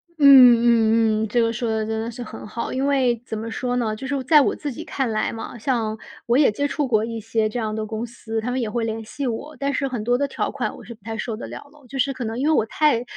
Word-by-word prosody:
嗯 310 - -3
嗯 230 -4 +6
嗯， - - -1
这 240 +3 0
个 230 0 +2
说 235 0 -2
得 220 -1 -1
真 220 0 -2
的 225 - -4
是 240 +1 -7
很 215 - -9
好。 235 +2 -4
因 265 +2 0
为 255 -5 +2
怎 220 - -5
么 225 +1 -5
说 245 +2 -2
呢， 225 -3 0
就 265 +5 -7
是 285 - -1
我 270 - -2
在 300 +3 +6
我 - - +1
自 290 - -5
己 305 +6 -7
看 270 -7 -2
来 215 - 0
嘛， 225 +1 -7
像 220 -2 -1 0.3
我 235 +2 +3
也 285 -5 +5
接 285 +7 -1
触 290 -1 -1
过 220 -3 +2
一 230 0 -5
些 225 0 0
这 240 - -4
样 215 -2 -2
的 220 0 -3
公 220 +1 -4
司， 225 -1 -5
他 235 - -3
们 255 +1 -1
也 235 - -1
会 230 +2 -2
联 225 0 -3
系 275 +4 -4
我。 270 +6 -5
但 280 0 0
是 275 +1 0
很 245 -5 -4
多 245 +2 +2
的 285 +2 0
条 - - -2
款 - - -3
我 - - -12
是 235 - -10
不 215 - -34
太 225 +1 -5
受 225 +1 -3
得 215 - -7
了 - - -8
咯。 295 -2 -20
就 270 +3 -6
是 275 +1 +1
可 260 - -6
能 225 +1 -4
因 280 - +1
为 315 - +4
我 220 - +3
太 265 0 +2
235 Hz, 325 characters per minute, -22 LUFS, 220-265 Hz, 0.3 s, 嗯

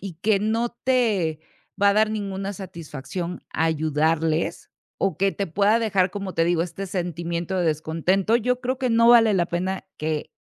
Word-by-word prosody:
y 195 -3 -7
que 200 +4 +1
no 225 +3 0
te 215 -12 +1 0.4
va 200 - +6
a - - +3
dar 215 0 +3
ninguna 195 -2 -3
satisfacción 170 -1 -7
ayudarles 160 +1 0 0.3
o 190 -5 0
que 195 +1 +2
te 200 - -3
pueda 205 +7 +2
dejar, 195 -5 +1
como 195 -2 -5
te 165 - +2
digo, 170 -1 +2
este 180 +3 -5
sentimiento 175 0 -3
de 175 -2 +1
descontento, 165 +7 +1
yo 250 +2 0
creo 255 +1 -2
que 255 -2 0
no 230 +1 +5
vale 225 -3 +6
la 175 -2 +2
pena 185 +3 -3
que 155 -1 -3
ha - - -62
190 Hz, 180 wpm, -24 LUFS, 165-215 Hz, 0.4 s, va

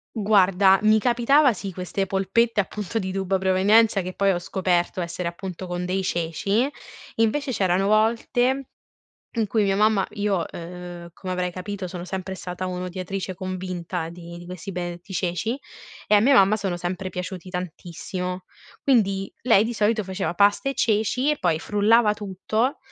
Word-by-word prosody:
Guarda 195 -2 +4
mi 215 0 +5
capitava 250 +4 +4
sì 195 -1 -6
queste 185 +2 -3
polpette 200 +4 +1
appunto 210 +2 -2
di 190 -1 -3
dubbia 190 0 0
provenienza, 195 +3 +4
che 185 0 -5
poi 200 +1 +2
ho 175 - 0
scoperto 180 0 0
essere 170 0 -3
appunto 185 +1 -7
con 175 0 -3
dei 190 +1 -1
ceci, 195 - 0 0.5
invece 255 +5 +1
c'erano 190 -1 +1
volte 240 +5 +2 0.7
in 225 -2 +1
cui 215 +1 +1
mia 195 -1 +2
mamma 210 -1 +3
io, 200 -4 0
uhm, 175 0 -8
come 185 0 -6
avrai 180 0 -1
capito 190 +1 -5
sono 175 -1 -6
sempre 190 +1 -5
stata 185 0 -5
un'odiatrice 185 +1 -4
convinta 180 -2 -4
di 170 0 -10
di 175 - -11
questi 180 +2 -7
benedetti 175 +2 -6
ceci, 180 +6 -1 0.5
e - - +5
a - - +5
mia 270 +6 +5
mamma 200 -2 +6
sono 195 -5 -2
sempre 180 +2 -4
piaciuti 180 0 -6
tantissimo, 180 +1 -5 0.4
quindi 195 -7 +2
lei 225 -4 +5
di 230 - -2
solito 215 0 +1
faceva 190 -2 -3
pasta 205 +7 +3
e 275 - -1
ceci 225 +5 +1
e 300 - +1
poi 165 -3 +1
frullava 210 +2 +3
tutto 210 +5 -2
190 Hz, 160 wpm, -24 LUFS, 180-215 Hz, 0.7 s, mamma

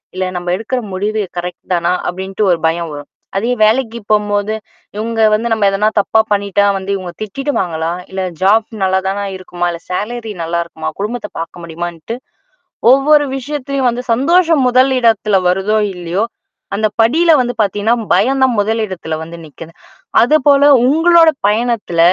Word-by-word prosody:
இல்ல 185 0 -1
நம்ம 175 0 -5
எடுக்கிற 225 +6 -3
முடிவு 210 +3 -1 0.2
கரெக்ட் 175 0 -6
தானா?"அப்டின்ட்டு 180 +3 -1
ஒரு 175 - +2
பயம் 165 0 -2
வரும். 145 -1 -9 0.3
அதே 230 +5 0
வேலைக்கு 230 +1 +1
போம்போது 210 0 +1 0.4
"இவுங்க 225 +1 -2
வந்து 220 +2 0
நம்ம 220 - -1
எதனா 205 +2 +1
தப்பா 220 - +1
பண்ணிட்டா 200 0 +1
வந்து, 190 0 -7
இவுங்க 185 -2 -6
திட்டிடுவாங்களா? 190 - -2 0.2
இல்ல 190 0 -3 0.2
ஜாப் 210 +3 +3 0.2
நல்லாதானா 190 +1 0
இருக்குமா? 175 -1 -4
இல்ல 170 - -6
சேலரி 220 +4 -4
நல்லாயிருக்குமா? 170 -1 -3
குடும்பத்த 210 +1 -4
பார்க்க 170 +1 -7
முடியுமான்ட்டு" 170 +4 -6 0.8
ஒவ்வொரு 290 +2 +4
விஷயத்திலும் 275 -1 -2
வந்து 240 +1 -3
சந்தோஷம் 325 +3 +3
முதல் 255 +2 +4
இடத்தில் 210 -5 +2
வருதோ 195 +4 +1 0.2
இல்லையோ, 180 +3 -2 0.5
அந்த 215 +2 +1
படியில் 310 +7 +4
வந்து 245 0 -2
பார்த்தீங்கன்னா 210 +3 +1 0.2
பயம் 265 +4 +2
தான் 250 -4 +2
முதல் 220 +2 0
இடத்தில் 160 -4 -5
வந்து 165 +1 -9
நிக்குது. 160 +2 -12 0.5
அது 300 +6 +4
போல 285 0 +5 0.2
உங்களுடைய 325 +2 +5
பயணத்தில, 220 -5 -1
210 Hz, 145 wpm, -15 LUFS, 180-245 Hz, 0.8 s, போல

